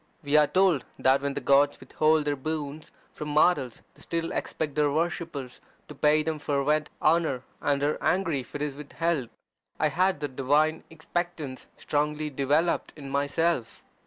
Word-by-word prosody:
We 145 +1 0
are 150 -1 +6
told 185 -6 +3
that 135 +1 +3
when 140 0 -2
the - - -1
gods 140 +2 +3
withhold 155 +3 +2
their 145 -1 0
boons 150 +1 -5 0.2
from 150 - -6
mortals 150 -5 +2
they - - -21
still 165 0 -3
expect 150 -3 -3
their 150 0 +2
worshippers 160 -4 -3 0.3
to - - -9
pay 150 +2 +3
them 160 -1 -2
fervent 150 +1 0
honour, 155 -5 +2 0.2
and 140 -1 +1
are 150 +1 0
angry 175 -6 +1
if 125 +1 -10
it 145 - -2
is 150 -2 -2
withheld. 150 -2 -2 0.5
I 155 - +3
had 185 +2 +1
that 145 -3 -4
divine 150 +4 +2
expectance 160 -3 -4
strongly 150 +1 -1
developed 145 +5 +1
in 140 -3 -8
myself. 140 -2 0
150 Hz, 160 wpm, -27 LUFS, 140-160 Hz, 0.5 s, are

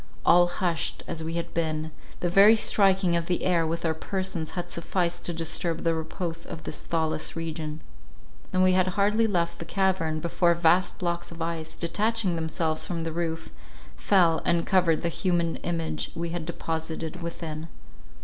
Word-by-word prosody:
All 175 0 +6
hushed 175 -1 -1
as 160 - -4
we 165 +1 -4
had 170 0 -4
been, 160 -1 -1 0.3
the 175 - +1
very 200 +5 +7
striking 195 -4 +3
of 170 0 -1
the 180 - 0
air 170 -3 +2
with 165 +1 -2
our 160 - +2
persons 180 -1 -3
had 175 0 -3
sufficed 175 +1 -1
to - - 0
disturb 165 0 -1
the 165 - +2
repose 165 +1 -4
of 160 - -8
this - - -4
thawless 160 -2 -1
region; 160 -2 -4 0.7
and 185 0 +3
we 185 - +5
had 185 0 +3
hardly 210 +3 +3
left 170 -4 -1
the - - -4
cavern, 180 -3 0
before 170 +1 +2
vast 170 +2 +3
blocks 175 -1 -2
of 170 - -10
ice, 165 -1 -3
detaching 205 +2 0
themselves 160 -1 -1
from 170 -2 -3
the 165 -1 -3
roof, 165 -1 -3 0.5
fell, 170 - +3
and 170 -1 +1
covered 175 -4 +3
the 170 - +1
human 170 -2 0
image 165 - -2
we 170 0 -3
had 165 -1 -4
deposited 160 0 -4
within. 165 -2 -5
170 Hz, 170 wpm, -27 LUFS, 160-180 Hz, 0.7 s, very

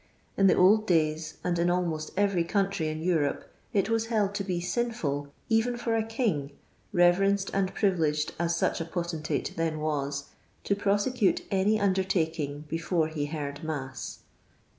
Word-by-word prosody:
In 195 - +4
the - - +5
old 215 +4 +5
days, 155 -2 +1
and 175 -1 0
in 170 +1 +2
almost 170 -3 -1
every 200 -4 +2
country 195 -2 0
in 155 +1 -4
Europe, 160 -5 +1 0.3
it 200 -5 +2
was 225 0 0
held 210 -4 +1
to 205 -1 -2
be 180 -3 -2
sinful 175 - -2 0.2
cvenfora 225 -1 +1
king 185 - -1 0.2
— - - -37
reverenced 195 +3 +3
and 195 -1 +1
privileged 160 -7 +1
as 170 0 +1
such 170 - 0
a - - -2
potentate 170 -2 -3
then 165 -1 -1
was 140 -2 -2 0.2
— - - -37
to 200 - +1
prosecute 205 +2 +1
any 200 +3 +2
undertaking 165 -7 0
before 165 +1 0
he 150 -2 -3
heard 145 0 -5
mass. 140 -4 -5
175 Hz, 155 wpm, -28 LUFS, 155-200 Hz, 0.3 s, the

